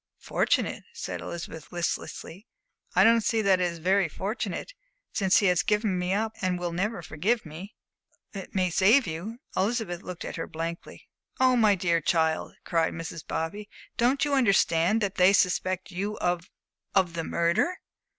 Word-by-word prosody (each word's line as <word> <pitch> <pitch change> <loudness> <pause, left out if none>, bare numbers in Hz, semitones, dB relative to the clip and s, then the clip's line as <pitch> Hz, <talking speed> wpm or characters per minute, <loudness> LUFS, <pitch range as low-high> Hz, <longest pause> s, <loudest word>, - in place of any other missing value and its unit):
"Fortunate?" - - 0
said 465 - -5
Elizabeth, 165 -2 -7
listlessly. 175 +3 -4 0.5
"I - - +6
don't 230 0 +5
see 220 0 +1
that 195 -2 +4
it - - +3
is 170 - -8
very 185 +1 +2
fortunate, 210 - -4 0.4
since 190 -4 +3
he 205 - +3
has 180 -2 +4
given 210 -3 +1
me 180 +1 -1
up 220 +3 0
and 185 -1 0
will 175 -1 -3
never 190 +2 -2
forgive 200 +10 -1
me." 170 +7 -9 0.6
"But 195 -2 -6
it - - -24
may 185 -2 +1
save 215 +10 +5
you." 175 +8 -5 0.2
Elizabeth 195 -4 -1
looked 180 -3 -7
at - - -6
her 165 - -4
blankly. 165 +1 -6 0.3
"Oh, 255 -1 +5
my 215 -4 +4
dear 170 -3 +1
child," 160 -2 0
cried 165 -2 0
Mrs. 165 -1 -6
Bobby, 205 +6 -4 0.3
"don't 260 +4 +2
you 290 - -1
understand 200 -5 +3
that 200 -2 -2
they 185 +1 +6
suspect 185 -1 +1
you 200 +4 -3
of 175 0 -1 0.5
of 185 -4 +3
the 165 -1 -3
murder?" 170 - +1
185 Hz, 170 wpm, -27 LUFS, 170-215 Hz, 0.6 s, I